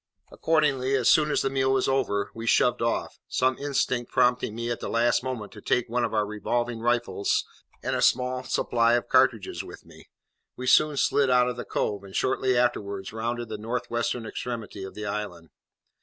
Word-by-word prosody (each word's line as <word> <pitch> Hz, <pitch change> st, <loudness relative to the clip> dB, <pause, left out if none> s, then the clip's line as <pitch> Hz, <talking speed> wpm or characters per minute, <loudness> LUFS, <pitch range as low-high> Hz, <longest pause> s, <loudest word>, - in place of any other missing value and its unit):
Accordingly, 135 Hz, -5 st, +1 dB
as 125 Hz, -3 st, +3 dB
soon 150 Hz, -1 st, +4 dB
as -, -, +1 dB
the 135 Hz, -, +1 dB
meal 135 Hz, -1 st, +1 dB
was 130 Hz, -1 st, +1 dB
over, 125 Hz, -7 st, 0 dB
we 115 Hz, 0 st, -7 dB
shoved 125 Hz, +1 st, +3 dB
off, 115 Hz, 0 st, -2 dB
some 130 Hz, 0 st, +1 dB
instinct 130 Hz, -4 st, -1 dB
prompting 125 Hz, -3 st, +2 dB
me, 115 Hz, +1 st, -3 dB
at 120 Hz, -, -3 dB
the -, -, -5 dB
last 120 Hz, +1 st, +2 dB
moment, 125 Hz, -5 st, -5 dB
to 105 Hz, -, -12 dB
take 125 Hz, -, 0 dB
one 120 Hz, +1 st, 0 dB
of 115 Hz, -, -1 dB
our 105 Hz, -1 st, +1 dB
revolving 115 Hz, +3 st, -2 dB
rifles 120 Hz, -3 st, 0 dB, 0.4 s
and -, -, -1 dB
a -, -, -1 dB
small 125 Hz, +1 st, +2 dB
supply 115 Hz, -2 st, +1 dB
of 120 Hz, -, +1 dB
cartridges -, -, +2 dB
with -, -, -12 dB
me. -, -, -17 dB, 0.5 s
We 125 Hz, -, -6 dB
soon 150 Hz, +3 st, +4 dB
slid 135 Hz, 0 st, +2 dB
out 125 Hz, 0 st, +4 dB
of 125 Hz, -, -4 dB
the 125 Hz, -, -6 dB
cove, 100 Hz, -1 st, -2 dB
and 95 Hz, -1 st, -11 dB
shortly 130 Hz, -1 st, +1 dB
afterwards 100 Hz, -5 st, -1 dB
rounded 120 Hz, +1 st, -3 dB
the 110 Hz, -1 st, -5 dB
north 115 Hz, +3 st, -4 dB
western 120 Hz, 0 st, -1 dB
extremity 110 Hz, -3 st, -6 dB
of 95 Hz, -, -8 dB
the 105 Hz, -, -5 dB
island. 100 Hz, -6 st, -5 dB
120 Hz, 195 wpm, -26 LUFS, 110-130 Hz, 0.5 s, soon